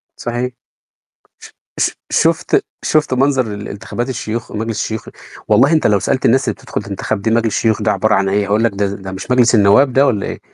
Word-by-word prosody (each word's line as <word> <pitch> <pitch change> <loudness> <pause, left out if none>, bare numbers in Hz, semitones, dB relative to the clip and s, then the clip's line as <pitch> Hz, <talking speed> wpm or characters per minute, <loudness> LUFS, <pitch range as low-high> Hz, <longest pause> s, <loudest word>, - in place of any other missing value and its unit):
صحيح. 120 +1 -3 0.9
ش - - -13 0.3
ش - - +2 0.2
شوفت - - +1 0.2
شوفت 155 -4 +1
منظر 130 -4 +1
انتخابات 110 +4 -5
الشيوخ؟ 115 -2 -4
مجلس 110 +1 -3
الشيوخ، 110 0 -5 0.4
والله 120 +8 +4
أنت 160 -7 +3
لو 105 -1 +3
سألت 130 - -1
الناس 130 +3 +4
اللي - - +1
بتدخل - - -5
تنتخب - - -4
دي 110 - 0
مجلس 115 0 +2
الشيوخ 110 -1 +1
ده 105 - +2
عبارة 105 +2 +1
عن 95 0 +1
إيه؟ 100 +1 +1
هيقول 105 +2 +1
لك: 115 - +2
"ده 100 -1 -3
مش 95 +6 -7
مجلس 125 -1 +4
النواب 110 +6 +4
ده 135 +2 +4
والَّا 105 -7 0
إيه؟" - - -6
110 Hz, 195 wpm, -16 LUFS, 105-125 Hz, 0.9 s, والله